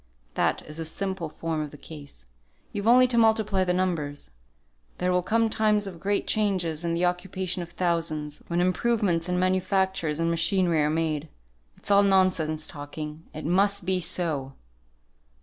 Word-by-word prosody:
That - - 0
is 155 +1 -10
the 165 - -4
simple 190 0 -3
form 160 0 -3
of 150 - -4
the 145 - -12
case; 145 - -11 0.5
you've 205 +1 -3
only 250 +2 +7
to 245 -2 +2
multiply 220 -4 +3
the 180 - 0
numbers. 165 - -2 0.7
There 180 0 0
will 180 0 +2
come 225 +5 +2
times 215 -1 +2
of 185 -4 -8
great 200 +2 0
changes 185 -7 0
in 170 0 0
the 175 +1 +1
occupation 185 0 -2
of 170 - -7
thousands, 165 -4 -2
when 170 +1 0
improvements 185 -2 +1
in 180 - 0
manufactures 185 -3 +1
and 165 0 +1
machinery 170 -1 +2
are 150 - +2
made. 155 -1 -1 0.5
It's - - -3
all 200 0 +7
nonsense 185 -6 +2
talking, 150 +2 -7
it 155 - -7
must 200 +3 +2
be 185 0 +1
so!" 155 -6 0
180 Hz, 165 wpm, -26 LUFS, 160-195 Hz, 0.7 s, only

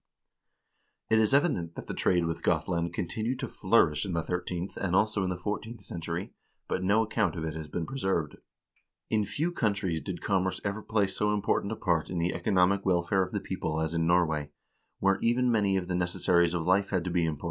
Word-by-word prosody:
4 110 - +4
It - - +5
is 110 - +2
evident 135 - +2
that - - -7
the - - -5
trade 90 -2 +2
with 80 0 -3
Gothland 85 +1 0
continued 110 +8 -2
to - - -4
flourish 75 - +2
in 95 -3 -3
the 85 -1 0
thirteenth 90 +1 -3
and 90 -2 -1
also 105 0 +2
in 95 - 0
the 90 - -2
fourteenth 105 +3 -5
century, 85 +1 -5 0.3
but - - -1
no 105 +4 +3
account 110 -6 0
of 80 - -4
it 80 - -3
has 80 -1 -6
been 80 +2 -3
preserved. 95 - -2 0.7
In 110 -2 +2
few 160 - -1
countries 100 - 0
did 95 -3 -5
commerce 95 -2 0
ever 100 +2 -2
play 105 -1 +1
so 105 +2 0
important 100 0 0
a - - -1
part 85 -6 0
in 90 - -3
the 85 +2 0
economic 95 0 +2
welfare 95 +1 +2
of 90 -1 -2
the - - -1
people 80 0 -3
as 80 0 -1
in 80 -1 +1
Norway, 80 -4 +2 0.5
where 95 0 +2
even 120 +1 +2
many 100 -4 +2
of 90 -2 -3
the 90 - -2
necessaries 90 -1 +2
of 80 -2 -2
life 95 +2 +3
had 90 -3 0
to 90 - -3
be 85 -1 +2
imported. 75 -3 -2
90 Hz, 215 wpm, -29 LUFS, 85-105 Hz, 0.7 s, It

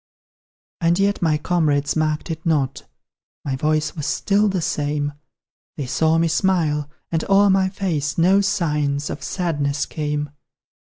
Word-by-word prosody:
And 170 +1 +3
yet 200 +1 +1
my 160 -3 +2
comrades 150 -3 +1
marked 155 +1 -1
it 160 0 -6
not: 140 -5 -1 0.6
My 135 -2 -1
voice 150 +2 0
was 150 -3 -4
still 205 +1 +2
the 190 -1 -1
same; 145 -2 -1 0.6
They 145 - -3
saw 160 +5 +2
me 165 0 +2
smile, 160 -4 +1 0.2
and 160 -1 0
o'er 200 0 +5
my 190 0 +3
face 170 -7 -2
No 185 +4 +4
signs 150 -6 0
of - - -6
sadness 145 -6 -1
came. 150 -1 -3
155 Hz, 145 wpm, -21 LUFS, 145-180 Hz, 0.6 s, o'er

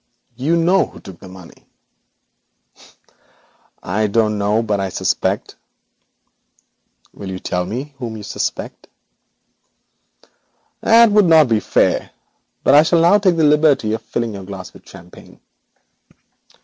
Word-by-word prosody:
You 140 +7 0
know 175 +3 +2
who - - -15
took 95 -3 -13
the - - -13
money.' 90 -2 -15 2.2
'I 105 +4 -1
don't 105 0 0
know, 105 +3 0
but 105 -2 -2
I 95 0 -2
suspect.' - - -2 1.6
'Will 100 - -9
you 95 - -5
tell 90 -1 -3
me 130 +8 -6
whom 115 -4 -6
you 105 - -10
suspect?' - - -5 1.9
'That 230 -1 +5
would 210 -1 +4
not 160 -5 +5
be 110 -2 +2
fair, - - 0 0.5
but - - +3
I 145 - +8
shall 165 +1 +2
now 175 +5 +4
take 185 -4 +1
the 160 - +2
liberty 145 -7 +3
of 110 - -3
filling 115 -1 -4
your 100 -1 -8
glass 95 -1 -9
with - - -18
champagne.' - - -16
115 Hz, 135 wpm, -18 LUFS, 100-160 Hz, 2.2 s, I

